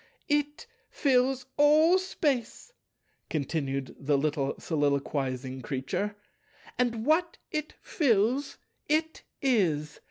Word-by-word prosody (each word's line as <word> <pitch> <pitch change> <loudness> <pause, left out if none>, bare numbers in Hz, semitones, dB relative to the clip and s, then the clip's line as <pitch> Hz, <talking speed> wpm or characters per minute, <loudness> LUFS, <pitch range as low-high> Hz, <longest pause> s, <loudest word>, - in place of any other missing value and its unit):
"It 295 +6 0 0.2
fills 260 -1 +2
all 310 +5 +6
Space," 300 - -2 0.6
continued 140 -3 -2
the 140 0 +1
little 140 -1 0
soliloquizing 140 -4 -1
Creature, 140 - -3 0.6
"and 235 -2 0
what 330 +3 +2
It 305 0 -3
fills, 255 - +1 0.3
It 315 +1 0 0.2
is. 170 - +1
230 Hz, 90 wpm, -28 LUFS, -, 0.6 s, all